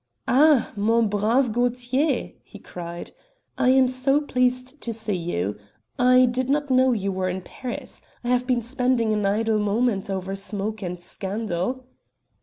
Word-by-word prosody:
"Ah! 285 -1 +4
mon 225 +2 +2
brave 220 +5 +2
Gaultier," 245 +4 0
he 205 - -14
cried, 170 -3 -8 0.4
"I 250 - +2
am 260 0 +5
so 260 +3 +2
pleased 255 0 -1
to 235 - -3
see 220 -1 -3
you. 165 - -2 0.4
I 255 +1 +6
did 250 +1 -1
not 290 0 0
know 260 0 +4
you 200 -4 -1
were 185 -1 -1
in 185 0 -4
Paris. 250 +4 -7 0.2
I 240 - -3
have 250 0 +1
been 245 -3 +1
spending 245 -2 +1
an 210 -2 0
idle 215 +2 +1
moment 210 -1 0
over 190 0 -3
smoke 205 +2 -3
and 180 -2 -4
scandal." 200 +6 -4
235 Hz, 155 wpm, -24 LUFS, 200-255 Hz, 0.4 s, I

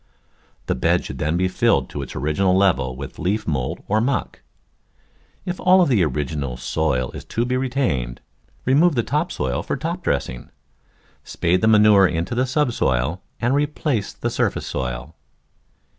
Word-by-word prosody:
The - - 0
bed 65 - +1
should - - -7
then 75 +3 0
be 95 +1 +2
filled 90 - +2
to 70 - -4
its 65 - -8
original 75 +8 +1
level 70 -10 +2
with 70 +1 -8
leaf 105 +4 -1
mould 70 -6 -2
or 110 +2 +2
muck. 130 +3 -2 1.0
If 180 0 -4
all 185 0 +5
the 120 - +3
original 70 -3 -2
soil 65 0 -1
is - - -8
to 120 - -1
be 125 +1 -1
retained, 125 - -1 0.5
remove 150 +5 +4
the 120 - +1
top 150 +8 -1
soil - - -2
for - - -3
top 170 +6 -4
dressing. 60 - -2 0.7
Spade 90 +2 0
the 110 - +3
manure 105 -3 +6
into 85 +4 -2
the 130 +2 +1
subsoil 95 - 0 0.2
and 120 +2 +1
replace 145 -5 0
the - - -4
surface - - -1
soil. 65 +3 -4
95 Hz, 160 wpm, -22 LUFS, -, 1.0 s, manure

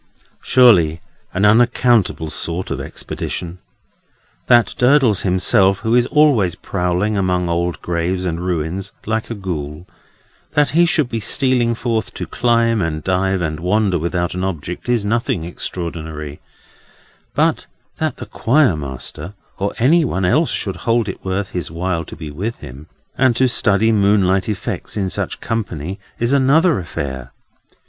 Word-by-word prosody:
Surely 90 -11 +5 0.3
an 95 +3 +1
unaccountable 115 -6 +3
sort 85 +2 -2
of - - -2
expedition! 90 +1 -5 0.9
That 120 -2 +4
Durdles 125 -5 +4
himself, 95 +1 +2
who 110 0 0
is 120 0 +4
always 130 - +3
prowling 90 +4 -1
among 90 -2 0
old 85 0 -1
graves, 90 +2 -1
and 85 -1 -3
ruins, 90 +2 -3
like 110 +1 -2
a 115 - -4
Ghoul—that 90 - -5
he 170 +2 +4
should 155 -5 +2
be 115 -2 -3
stealing 120 0 +2
forth 115 -1 -2
to - - -4
climb, 115 -2 +1
and 80 -2 -2
dive, 95 0 0
and 80 -2 -2
wander 95 +1 +1
without 85 +1 -2
an 90 +1 -3
object, 90 +3 -4
is 120 -4 +1
nothing 115 -5 -1
extraordinary; 80 -4 -6 1.0
but - - +1 0.3
that - - -2
the - - -7
Choir 130 - +2
Master 75 +5 -6 0.2
or 100 +1 -2
any 160 +8 +4
one 95 -9 -1
else 90 - +2
should - - -3
hold 115 -2 0
it - - -7
worth 95 +1 -2
his 90 -4 -4
while 85 +1 -2
to - - -10
be 75 -2 -8
with 105 +10 -4
him, 70 +1 -11 0.3
and 130 -2 +4
to 130 +2 +3
study 110 -2 +2
moonlight 100 -1 +2
effects 105 +1 -4
in 95 -3 -1
such - - -2
company 95 -5 -4 0.2
is 120 +3 0
another 140 - +4
affair. 65 -6 -5
95 Hz, 145 wpm, -18 LUFS, 85-115 Hz, 1.0 s, Surely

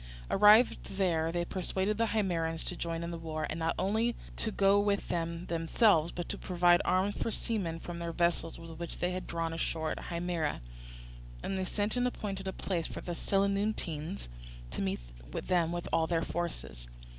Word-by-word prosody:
Arrived 210 -1 +5
there, 165 -4 +2
they 175 0 -1
persuaded 190 +3 -1
the 230 - +3
Himeraeans 170 -7 0
to 180 - -1
join 165 -1 -3
in 170 - -3
the 170 - -5
war, 155 -1 -3
and 160 - -3
not 165 0 0
only 220 +5 +1 0.2
to 225 - 0
go 200 -1 +4
with 205 -1 +1
them 170 0 -2
themselves 165 +1 +3
but 175 - -4
to - - -3
provide 175 -1 +4
arms 190 +3 +2
for - - -2
the 230 - 0
seamen 190 -9 -2
from 170 0 -6
their 170 0 -3
vessels 170 -1 +1
which 165 0 -7
they 180 - 0
had 185 0 -4
drawn 165 -1 -2
ashore 160 -1 -1
at - - -5
Himera; 170 - -1 0.8
and 195 - -2
they 190 -1 -1
sent 205 +5 0
and 245 0 +3
appointed 195 -5 -4
a - - 0
place 175 -3 -2
for - - -6
the 175 - -4
Selinuntines 195 -3 0 0.4
to - - -3
meet 95 -5 0 0.3
them 170 -2 +1
with 175 0 -3
all 160 0 +3
their 165 -1 +1
forces. 65 - -4
175 Hz, 185 wpm, -32 LUFS, 165-195 Hz, 0.8 s, Arrived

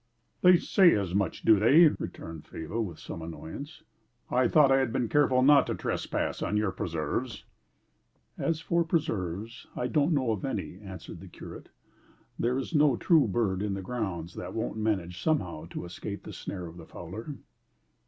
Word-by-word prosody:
"They 180 0 +7
say 180 0 +5
as 95 -4 -2
much 95 -3 -1
do 110 -3 +6
they?" 140 - +7
returned 80 - -3
Faber 80 +9 -4
with 90 -8 -4
some - - -8
annoyance. 85 - -8 0.5
"I 125 0 +3
thought 145 -1 +5
I 135 - +5
had 130 -4 0
been 120 - 0
careful 130 -3 +3
not 145 +1 +6
to - - -1
trespass - - -2
on 105 - 0
your 105 -2 +1
preserves." 85 - -3 0.9
"As 165 -1 -1
for 170 +1 +1
preserves, 115 - -2
I - - -2
don't 145 +6 +2
know 130 -6 +1
of 105 - -3
any," 100 -8 -4
answered 95 -4 -9
the - - -11
curate. - - -10 0.7
"There 125 +2 +1
is 135 - -4
no 145 -5 +4
true 160 -7 +4
bird 95 -2 0
in 100 -2 -1
the 95 - -5
grounds 90 -7 -4
that - - -7
won't 110 -1 -2
manage 95 -5 -1
somehow 90 - -1
to 85 - -7
escape 100 +4 -7
the - - -8
snare 90 -3 -6
of 85 +1 -10
the 80 - -11
fowler." 105 - -7
110 Hz, 175 wpm, -29 LUFS, 90-140 Hz, 0.9 s, They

